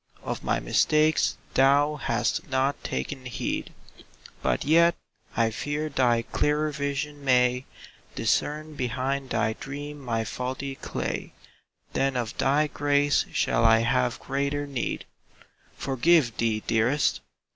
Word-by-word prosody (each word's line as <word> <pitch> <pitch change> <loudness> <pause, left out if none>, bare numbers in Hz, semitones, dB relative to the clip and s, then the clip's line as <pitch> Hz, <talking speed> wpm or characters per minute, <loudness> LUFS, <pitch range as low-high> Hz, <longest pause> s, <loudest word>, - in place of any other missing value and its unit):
Of - - -4
my - - +1
mistakes 155 - +2 0.2
thou 140 +3 +4
hast 120 -3 -1
not 130 +2 0
taken 130 - -4
heed. 125 - -3 0.7
But - - 0
yet 170 +3 +5 0.4
I 115 -1 +3
fear 145 +6 -3
thy 120 -4 +2
clearer 150 +4 0
vision 145 0 -3
may 125 -1 +3 0.5
Discern 155 +1 0
behind 130 +1 -2
thy 110 - +1
dream 145 +4 -7
my 115 -4 -1
faulty 130 +4 -4
clay - - -4 0.3
— - - -39
Then 135 -1 +1
of 115 -3 -3
thy 145 +3 +3
grace 145 0 +1
shall 115 - +1
I 115 0 +6
have 125 +1 +1
greater 140 +1 -2
need. 140 -3 -3 0.7
Forgive 135 -2 +3
thee, 110 -2 0
dearest? 120 +6 +2
135 Hz, 125 wpm, -26 LUFS, 125-145 Hz, 0.7 s, I